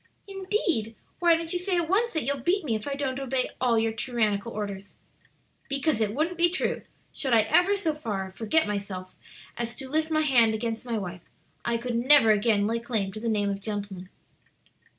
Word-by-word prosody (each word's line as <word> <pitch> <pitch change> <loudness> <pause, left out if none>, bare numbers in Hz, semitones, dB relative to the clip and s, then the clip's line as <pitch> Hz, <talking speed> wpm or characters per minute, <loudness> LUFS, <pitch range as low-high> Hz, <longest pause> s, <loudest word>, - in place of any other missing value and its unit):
"Indeed! 375 - -1 0.2
Why 340 -1 +5
don't 330 +1 -4
you 355 - 0
say 360 0 0
at 340 -2 0
once 440 +7 +1
that 315 - 0
you'll 280 +3 -1
beat 350 +7 0
me 240 - 0
if 215 +2 -3
I 280 - -2
don't 275 -2 -2
obey 265 -1 -1
all 240 -3 +3
your 225 0 +2
tyrannical 225 -2 -1
orders?" 200 -2 -6 0.7
"Because 275 -3 0
it 210 0 0
wouldn't 330 +4 -1
be 345 0 +6
true; 365 - -1 0.3
should 265 -4 0
I 225 - +6
ever 360 - +3
so 350 -6 -1
far 205 -10 -4
forget 225 +11 +1
myself 200 -3 -5 0.4
as 235 -1 -3
to 265 - -7
lift 310 +3 0
my 310 -1 +2
hand 240 -7 +4
against 225 +1 -3
my 235 -2 -2
wife, 180 -3 -5 0.4
I 235 -1 0
could 240 0 -3
never 245 -1 +6
again 210 -1 +3
lay 230 +2 0
claim 220 -5 -1
to 215 - -6
the 230 +1 -2
name 205 -2 +1
of 200 0 -5
gentleman." 200 -3 -5
235 Hz, 200 wpm, -27 LUFS, 215-310 Hz, 0.7 s, be